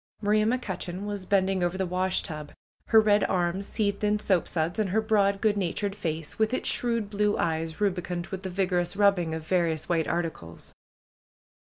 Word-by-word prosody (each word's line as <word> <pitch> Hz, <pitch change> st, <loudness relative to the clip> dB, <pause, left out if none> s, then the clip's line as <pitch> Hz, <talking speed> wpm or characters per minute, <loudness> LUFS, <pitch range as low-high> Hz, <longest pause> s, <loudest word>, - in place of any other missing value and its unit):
Maria 215 Hz, 0 st, +2 dB
McCutcheon 200 Hz, -6 st, -3 dB
was 205 Hz, -2 st, -5 dB
bending 190 Hz, -1 st, +2 dB
over 175 Hz, +1 st, 0 dB
the 190 Hz, -, 0 dB
washtub, 180 Hz, -4 st, -1 dB, 0.4 s
her 225 Hz, -, +6 dB
red 210 Hz, -1 st, +4 dB
arms 185 Hz, +1 st, -1 dB
seethed 200 Hz, -2 st, -1 dB
in 210 Hz, 0 st, +2 dB
soapsuds, 175 Hz, -3 st, 0 dB
and 210 Hz, -3 st, +1 dB
her 210 Hz, +4 st, +2 dB
broad, 205 Hz, -3 st, +2 dB
good 215 Hz, -2 st, +3 dB
natured 200 Hz, +2 st, -2 dB
face, 160 Hz, -5 st, -4 dB
with 220 Hz, +3 st, +2 dB
its -, -, -3 dB
shrewd 230 Hz, -3 st, 0 dB
blue 210 Hz, 0 st, +1 dB
eyes 160 Hz, -1 st, -2 dB
rubicund 180 Hz, -3 st, -1 dB
with 190 Hz, -1 st, -5 dB
the 190 Hz, -, -4 dB
vigorous 180 Hz, -1 st, 0 dB
rubbing 195 Hz, -5 st, +2 dB
of 160 Hz, -1 st, -6 dB
various 165 Hz, -3 st, 0 dB
white 165 Hz, -2 st, +1 dB
articles. 160 Hz, -, -4 dB
190 Hz, 170 wpm, -27 LUFS, 175-205 Hz, 0.4 s, her